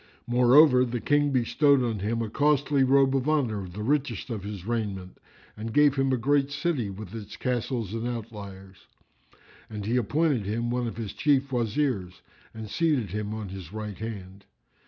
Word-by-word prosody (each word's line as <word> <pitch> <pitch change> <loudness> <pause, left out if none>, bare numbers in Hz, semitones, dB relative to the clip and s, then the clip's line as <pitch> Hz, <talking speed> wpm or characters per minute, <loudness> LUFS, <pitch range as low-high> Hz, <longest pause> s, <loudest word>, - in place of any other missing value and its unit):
Moreover, 125 +2 +6
the 120 -1 -2
King 145 +3 +2
bestowed 130 +2 +3
on 115 -4 -2
him 115 +4 -1
a 110 - -4
costly 145 -1 +2
robe 135 0 +4
of 135 +2 0
honour 125 -10 +1
of 90 -2 -10
the 105 +2 -5
richest 130 -4 -1
of 110 -3 -3
his 100 -3 -7
raiment 100 -5 -4 0.4
and 110 +1 -6
gave 145 +2 +5
him 135 -1 +1
a 130 - +2
great 140 +3 +2
city 145 - -1
with 100 0 -9
its 105 -2 -8
castles 120 -4 -2
and 115 +1 -3
outliers; 100 -5 -8 0.8
and 105 -2 -6
he 115 +4 +1
appointed 140 +1 +1
him 115 +3 -1
one 125 -1 -1
of 115 - -6
his 110 -4 -5
Chief 140 -3 +1
Wazirs 115 -6 -1 0.3
and 110 -1 -8
seated 135 - 0
him 105 +1 -3
on 105 -3 -6
his 95 -3 -9
right 105 -2 -6
hand. 100 -3 -7
115 Hz, 175 wpm, -27 LUFS, 105-135 Hz, 0.8 s, Moreover